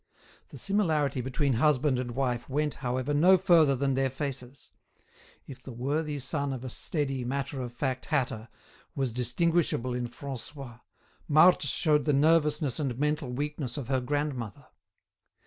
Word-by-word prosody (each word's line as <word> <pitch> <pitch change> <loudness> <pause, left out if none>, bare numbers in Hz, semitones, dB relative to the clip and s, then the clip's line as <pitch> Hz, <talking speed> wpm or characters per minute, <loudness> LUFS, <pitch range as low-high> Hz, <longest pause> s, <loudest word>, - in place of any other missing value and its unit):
The - - -11
similarity 155 -10 0
between 130 +2 0
husband 135 +1 +2
and 120 -2 -4
wife 125 -2 -1
went, 150 +2 0
however, 130 +2 -1
no 180 +6 +6
further 165 -6 +4
than 135 +1 0
their 135 0 +1
faces; 135 -1 -6 0.7
if 130 -2 -11
the 130 - -9
worthy 145 +5 -2
son 140 +1 -2
of 130 -1 -6
a 130 - -5
steady 135 -4 -2
matter 135 +2 -3
of 120 -1 -5
fact 130 +1 -3
hatter 120 -7 -1 0.5
was 135 -4 -1
distinguishable 125 +1 0
in 125 0 -2
Francois, 130 0 -8 0.5
Marthe 155 +4 +6
showed 150 +1 +2
the 150 - +2
nervousness 150 -1 +2
and 135 -5 -2
mental 150 -1 -1
weakness 140 0 -3
of 135 -3 -5
her 130 -2 +1
grandmother. 140 -2 -3
135 Hz, 145 wpm, -28 LUFS, 125-150 Hz, 0.7 s, no